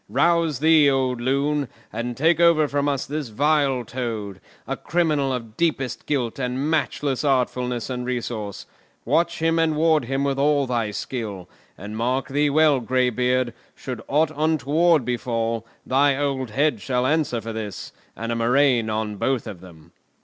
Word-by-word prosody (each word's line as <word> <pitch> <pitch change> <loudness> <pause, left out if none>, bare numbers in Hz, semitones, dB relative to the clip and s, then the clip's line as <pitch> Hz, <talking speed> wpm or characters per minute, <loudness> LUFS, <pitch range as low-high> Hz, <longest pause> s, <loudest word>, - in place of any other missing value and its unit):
"Rouse 165 +4 +2
thee, 155 -2 +6
old 130 -3 0
loon, 140 +2 0 0.3
and 120 +1 -4
take 165 +4 +3
over 170 -3 +5
from 145 0 0
us 140 -2 -1
this 150 -1 -4
vile 140 0 +1
Toad, 110 -6 -5 0.2
a - - -3
criminal 155 -5 0
of 115 -4 -5
deepest 150 -6 -1
guilt 130 -4 -1
and 130 +4 -1
matchless 145 -3 -1
artfulness 125 -3 0
and 125 -1 -4
resource. 120 -5 -4 0.4
Watch 170 -1 +1
and 165 -1 +2
ward 155 -3 +3
him 135 +2 -1
with 140 -1 0
all 145 0 +3
thy 120 -4 -1
skill; 105 -4 -5 0.3
and 105 +3 -7
mark 125 +4 -1
thee 145 +2 +2
well, 150 -1 +4
greybeard, 125 0 +1 0.2
should 125 -3 -6
aught 155 +2 +2
untoward 155 0 +2
befall, 115 -2 -2 0.2
thy 140 +1 +3
old 135 -3 -1
head 130 -1 +1
shall 125 -1 0
answer 150 -4 +1
for 115 +1 -6
his—and 110 +1 -7
a - - 0
murrain 120 0 +2
on 110 -1 -2
both 130 +3 0
of 100 -6 -8
them!" 85 -3 -15
130 Hz, 155 wpm, -23 LUFS, 115-150 Hz, 0.4 s, thee